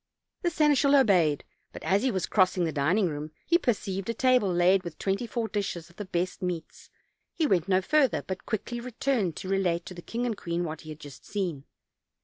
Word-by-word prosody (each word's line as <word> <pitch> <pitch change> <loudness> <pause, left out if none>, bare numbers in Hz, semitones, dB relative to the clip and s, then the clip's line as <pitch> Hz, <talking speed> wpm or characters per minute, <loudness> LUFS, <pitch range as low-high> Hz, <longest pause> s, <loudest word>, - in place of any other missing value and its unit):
The 350 - +1
seneschal 295 -3 +4
obeyed; 180 - +4 0.3
but - - -10
as 195 +2 +2
he 260 - +2
was 190 -6 -1
crossing 185 -2 +2
the 165 - 0
din 155 +6 +1
ing 205 -4 +3
room 150 -1 -4 0.2
he 340 0 +4
perceived 195 - -1
a 230 - -1
table 250 -6 +3
laid 180 +2 +4
with 170 -3 -8
twenty 195 +5 -1
four 230 -1 -2
dishes 195 -6 -3
of 175 - -26
the 210 - -5
best 180 +1 -2
meats. 175 -3 -5 0.5
He 320 - +1
went 185 - +2
no 190 -1 +3
further, 285 +1 +2
but 190 0 -6
quickly 235 +2 -3
returned 240 - -1
to 185 - -6
relate 180 -3 0
to - - -8
the 175 - -9
king 235 +7 -3
and 235 -3 -1
queen 170 -2 -2
what 160 -2 -5
he 155 - -11
had 155 0 -8
just 145 -3 -11
seen. 175 -9 -3
190 Hz, 215 wpm, -28 LUFS, 175-235 Hz, 0.5 s, seneschal